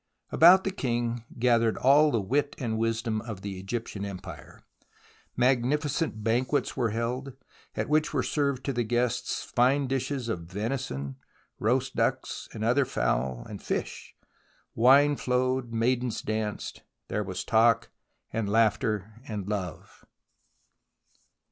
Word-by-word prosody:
About 180 Hz, +4 st, +7 dB
the 195 Hz, -, -1 dB
king 120 Hz, -, -2 dB
gathered 115 Hz, -2 st, +3 dB
all 145 Hz, +4 st, +5 dB
the 120 Hz, -, +1 dB
wit 140 Hz, +8 st, 0 dB
and 115 Hz, -4 st, -2 dB
wisdom 115 Hz, -1 st, -1 dB
of 110 Hz, -4 st, -7 dB
the 95 Hz, -2 st, -5 dB
Egyptian 100 Hz, +1 st, -4 dB
empire. 100 Hz, -2 st, -8 dB, 0.8 s
Magnificent 130 Hz, +1 st, +1 dB
banquets 125 Hz, +6 st, 0 dB
were 120 Hz, -4 st, +1 dB
held, 125 Hz, +5 st, -3 dB, 0.4 s
at -, -, -2 dB
which 155 Hz, +1 st, +2 dB
were 135 Hz, -4 st, 0 dB
served 140 Hz, -3 st, 0 dB
to 140 Hz, -, -2 dB
the 120 Hz, -, 0 dB
guests 120 Hz, +2 st, -1 dB
fine 130 Hz, +3 st, +2 dB
dishes 135 Hz, -1 st, -2 dB
of 110 Hz, -7 st, -2 dB
venison, 95 Hz, -, -4 dB, 0.4 s
roast 130 Hz, +4 st, 0 dB
ducks -, -, -1 dB
and 110 Hz, -, -5 dB
other 125 Hz, +5 st, +3 dB
fowl, -, -, -1 dB
and -, -, -8 dB
fish. -, -, -4 dB, 0.6 s
Wine 140 Hz, +5 st, +5 dB
flowed, 125 Hz, -1 st, 0 dB
maidens 120 Hz, +1 st, 0 dB
danced. 110 Hz, -1 st, -3 dB, 0.3 s
There 105 Hz, -, -1 dB
was 95 Hz, -2 st, -4 dB
talk 115 Hz, 0 st, +3 dB, 0.4 s
and 110 Hz, -3 st, -1 dB
laughter 110 Hz, 0 st, +1 dB
and 105 Hz, -3 st, -4 dB
love. 95 Hz, -5 st, -5 dB
120 Hz, 130 wpm, -28 LUFS, 110-130 Hz, 0.8 s, About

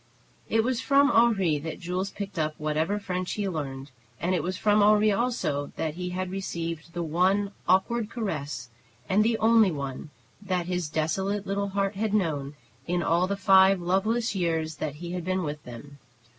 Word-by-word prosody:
It 225 Hz, 0 st, +3 dB
was 255 Hz, 0 st, 0 dB
from 280 Hz, +1 st, +4 dB
Henri 195 Hz, -10 st, +3 dB
that 160 Hz, +2 st, -6 dB
Jules 180 Hz, +3 st, -2 dB
picked 195 Hz, -2 st, -6 dB
up 155 Hz, 0 st, -1 dB
whatever 155 Hz, +6 st, 0 dB
French 185 Hz, -3 st, -3 dB
he 205 Hz, -2 st, -2 dB
learned, 140 Hz, -5 st, -5 dB, 0.3 s
and 180 Hz, +2 st, 0 dB
it 180 Hz, -, +1 dB
was 185 Hz, +4 st, -3 dB
from 210 Hz, 0 st, +3 dB
Henri 210 Hz, +1 st, +5 dB
also 200 Hz, -, -1 dB
that 155 Hz, -2 st, -2 dB
he 180 Hz, +2 st, -4 dB
had 185 Hz, 0 st, -3 dB
received 170 Hz, -4 st, -4 dB
the 175 Hz, -1 st, -2 dB
one 185 Hz, +5 st, +1 dB, 0.2 s
awkward 215 Hz, +4 st, +2 dB
caress, 150 Hz, -, -4 dB, 0.4 s
and 205 Hz, +3 st, +3 dB
the 225 Hz, 0 st, +2 dB
only 225 Hz, -2 st, +5 dB
one, 140 Hz, -2 st, -5 dB, 0.3 s
that 185 Hz, -3 st, -1 dB
his 180 Hz, -3 st, -2 dB
desolate 190 Hz, +6 st, -1 dB
little 200 Hz, +1 st, -1 dB
heart 195 Hz, 0 st, 0 dB
had 215 Hz, 0 st, 0 dB
known 150 Hz, -7 st, -1 dB, 0.3 s
in 175 Hz, 0 st, 0 dB
all 170 Hz, +2 st, +2 dB
the 200 Hz, +1 st, -2 dB
five 190 Hz, 0 st, +5 dB
loveless 210 Hz, +6 st, 0 dB
years 160 Hz, -4 st, -1 dB
that 150 Hz, -1 st, -3 dB
he 170 Hz, +3 st, -7 dB
had 180 Hz, -1 st, -3 dB
been 185 Hz, +1 st, -1 dB
with 150 Hz, -1 st, -4 dB
them. 140 Hz, +4 st, -11 dB
185 Hz, 180 wpm, -27 LUFS, 160-205 Hz, 0.4 s, Henri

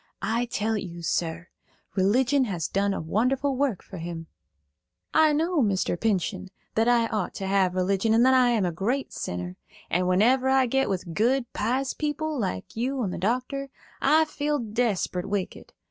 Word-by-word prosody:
I 235 Hz, +2 st, 0 dB
tell 220 Hz, -1 st, -1 dB
you, 175 Hz, -3 st, -7 dB
sir, 165 Hz, +1 st, -2 dB, 0.5 s
religion 250 Hz, +8 st, +3 dB
has 175 Hz, -8 st, -2 dB
done 200 Hz, +1 st, 0 dB
a -, -, -2 dB
wonderful 255 Hz, -, 0 dB
work 260 Hz, -7 st, 0 dB
for 190 Hz, -, -9 dB
him." 165 Hz, 0 st, -6 dB, 0.9 s
"I 315 Hz, -1 st, +5 dB
know, 325 Hz, +2 st, +1 dB
Mr. 195 Hz, -6 st, +1 dB
Pinchen, 195 Hz, -2 st, -1 dB, 0.3 s
that 225 Hz, +1 st, +2 dB
I 240 Hz, -1 st, +4 dB
ought 215 Hz, -5 st, -3 dB
to 195 Hz, -, -4 dB
have 190 Hz, -2 st, +2 dB
religion, 195 Hz, +4 st, +1 dB
and 235 Hz, +2 st, +5 dB
that 260 Hz, -, +5 dB
I 255 Hz, -1 st, +5 dB
am 225 Hz, -5 st, +2 dB
a 175 Hz, -, 0 dB
great 235 Hz, +11 st, -2 dB
sinner; 90 Hz, 0 st, -5 dB, 0.3 s
and 180 Hz, +2 st, +1 dB
whenever 245 Hz, +8 st, +3 dB
I 265 Hz, -1 st, +4 dB
get 270 Hz, +2 st, +1 dB
with 185 Hz, -3 st, -3 dB
good, 240 Hz, +7 st, +2 dB
pious 255 Hz, +5 st, -1 dB
people, 305 Hz, +1 st, -2 dB
like 95 Hz, -, -3 dB
you 255 Hz, +3 st, -1 dB
and 185 Hz, -4 st, -2 dB
the -, -, -5 dB
doctor, 255 Hz, +7 st, -1 dB, 0.3 s
I 315 Hz, +1 st, +4 dB
feel 295 Hz, -1 st, -1 dB
desperate 215 Hz, -6 st, -1 dB
wicked. 200 Hz, -2 st, -4 dB
225 Hz, 175 wpm, -26 LUFS, 185-265 Hz, 0.9 s, I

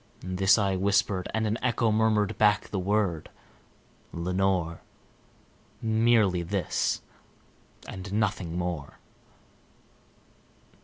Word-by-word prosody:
This 95 Hz, +2 st, +3 dB
I 100 Hz, -3 st, +1 dB
whispered, 100 Hz, -1 st, +1 dB
and 110 Hz, 0 st, -1 dB
an 110 Hz, +1 st, -1 dB
echo 120 Hz, -2 st, +1 dB
murmured 105 Hz, -2 st, +2 dB
back 105 Hz, -1 st, +3 dB
the 95 Hz, -, -2 dB
word, 95 Hz, -4 st, 0 dB, 0.8 s
"Lenore!" 90 Hz, -1 st, -1 dB, 1.0 s
Merely 110 Hz, -5 st, +2 dB
this 90 Hz, 0 st, -1 dB, 0.9 s
and 95 Hz, +1 st, -7 dB
nothing 100 Hz, -5 st, -1 dB
more. 85 Hz, -5 st, -4 dB
100 Hz, 90 wpm, -27 LUFS, 90-105 Hz, 1.0 s, This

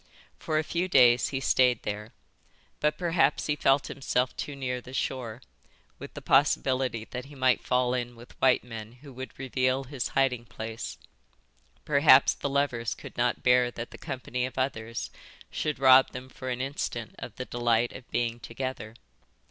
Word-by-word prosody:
For 155 Hz, -, -1 dB
a 155 Hz, -, +2 dB
few 170 Hz, +3 st, -1 dB
days 125 Hz, -7 st, +5 dB
he 135 Hz, -, -3 dB
stayed 125 Hz, -3 st, +3 dB
there. 105 Hz, +2 st, -5 dB, 0.7 s
But 150 Hz, 0 st, +1 dB
perhaps 165 Hz, -5 st, +2 dB
he 150 Hz, -, 0 dB
felt 135 Hz, -1 st, +3 dB
himself 130 Hz, -2 st, -1 dB
too 145 Hz, -, -5 dB
near 125 Hz, -2 st, -3 dB
the 125 Hz, +2 st, -10 dB
shore, 125 Hz, -3 st, -3 dB, 0.6 s
with -, -, -10 dB
the -, -, -8 dB
possibility 120 Hz, -, +2 dB
that 125 Hz, +1 st, -5 dB
he 145 Hz, +1 st, -13 dB
might 130 Hz, -2 st, +2 dB
fall 125 Hz, -1 st, +1 dB
in 120 Hz, -1 st, -3 dB
with 120 Hz, +1 st, -14 dB
white 130 Hz, -1 st, +4 dB
men 115 Hz, -2 st, -8 dB
who 140 Hz, -3 st, -11 dB
would 130 Hz, +1 st, -8 dB
reveal 130 Hz, 0 st, 0 dB
his 130 Hz, -1 st, -4 dB
hiding 125 Hz, -3 st, +2 dB
place; 115 Hz, 0 st, -6 dB, 0.9 s
perhaps 140 Hz, -2 st, +6 dB
the 140 Hz, -, -4 dB
lovers 135 Hz, -5 st, 0 dB
could -, -, -11 dB
not 120 Hz, 0 st, 0 dB
bear 125 Hz, 0 st, +4 dB
that 120 Hz, -1 st, -7 dB
the -, -, -10 dB
company 125 Hz, -1 st, -4 dB
of 130 Hz, +1 st, -4 dB
others 115 Hz, -3 st, -3 dB, 0.4 s
should 150 Hz, -1 st, -2 dB
rob 130 Hz, 0 st, +6 dB
them 125 Hz, +1 st, -8 dB
for 130 Hz, 0 st, -7 dB
an 125 Hz, 0 st, -2 dB
instant 130 Hz, -4 st, -4 dB
of -, -, -8 dB
the 130 Hz, -, -5 dB
delight 120 Hz, -1 st, +1 dB
of 130 Hz, -, -11 dB
being 120 Hz, -1 st, -1 dB
together. 115 Hz, -2 st, -6 dB
130 Hz, 170 wpm, -28 LUFS, 120-135 Hz, 0.9 s, perhaps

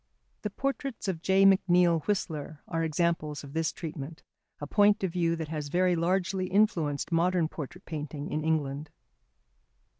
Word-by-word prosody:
The 210 Hz, -, -2 dB
portraits 275 Hz, +1 st, -3 dB
of 175 Hz, -4 st, -2 dB
J. 190 Hz, +2 st, +4 dB
McNeill 180 Hz, -4 st, +4 dB
Whistler 155 Hz, -7 st, -2 dB
are 165 Hz, -1 st, -1 dB
examples 160 Hz, -2 st, -1 dB
of 140 Hz, -1 st, -10 dB
this 160 Hz, -1 st, 0 dB
treatment, 155 Hz, -1 st, -7 dB, 0.4 s
a 145 Hz, -, -4 dB
point 205 Hz, +5 st, +3 dB
of 190 Hz, -, 0 dB
view 170 Hz, -2 st, +1 dB
that 160 Hz, -2 st, -5 dB
has 155 Hz, -2 st, -3 dB
very 180 Hz, +3 st, +2 dB
largely 185 Hz, +2 st, 0 dB
influenced 180 Hz, -8 st, +1 dB
modern 170 Hz, 0 st, +2 dB
portrait 165 Hz, +4 st, -8 dB
painting 150 Hz, -2 st, -5 dB
in 155 Hz, -, -1 dB
England. 150 Hz, -2 st, -1 dB
165 Hz, 150 wpm, -29 LUFS, 155-185 Hz, 0.4 s, J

